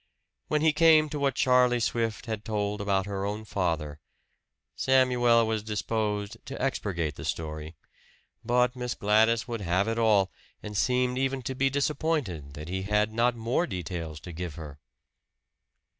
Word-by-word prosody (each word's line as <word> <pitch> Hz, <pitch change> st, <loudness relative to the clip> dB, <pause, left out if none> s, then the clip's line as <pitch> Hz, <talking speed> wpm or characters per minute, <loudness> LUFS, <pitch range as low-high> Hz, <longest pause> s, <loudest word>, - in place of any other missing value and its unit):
When 150 Hz, -1 st, +1 dB
he 160 Hz, -1 st, +4 dB
came 155 Hz, -1 st, +5 dB
to 150 Hz, -, -4 dB
what 140 Hz, -2 st, +1 dB
Charlie 125 Hz, -2 st, +4 dB
Swift 115 Hz, 0 st, -1 dB
had 110 Hz, -3 st, -4 dB
told 105 Hz, -1 st, -2 dB
about 100 Hz, -1 st, +1 dB
her 100 Hz, -1 st, -3 dB
own 105 Hz, +2 st, -3 dB
father, 80 Hz, -7 st, -2 dB, 0.8 s
Samuel 125 Hz, -3 st, +4 dB
was 110 Hz, -1 st, -1 dB
disposed 105 Hz, 0 st, -2 dB
to 135 Hz, -, -6 dB
expurgate 90 Hz, -, -2 dB
the -, -, -7 dB
story; 80 Hz, 0 st, -4 dB, 0.7 s
but 125 Hz, +1 st, +2 dB
Miss 125 Hz, 0 st, -3 dB
Gladys 110 Hz, +2 st, +3 dB
would 115 Hz, -3 st, -4 dB
have 95 Hz, +3 st, +1 dB
it 115 Hz, +1 st, -1 dB
all, 105 Hz, -4 st, +3 dB, 0.3 s
and 105 Hz, 0 st, -7 dB
seemed 125 Hz, +3 st, +1 dB
even 135 Hz, -1 st, -1 dB
to 130 Hz, -, -3 dB
be 135 Hz, +1 st, +1 dB
disappointed 140 Hz, -, -1 dB
that 75 Hz, +1 st, -8 dB
he 95 Hz, +2 st, -3 dB
had 105 Hz, +2 st, +1 dB
not 120 Hz, +2 st, +2 dB
more 120 Hz, +9 st, 0 dB
details 85 Hz, -, -5 dB
to 90 Hz, -, -8 dB
give 85 Hz, -2 st, -6 dB
her. 75 Hz, -3 st, -9 dB
110 Hz, 160 wpm, -28 LUFS, 95-125 Hz, 0.8 s, came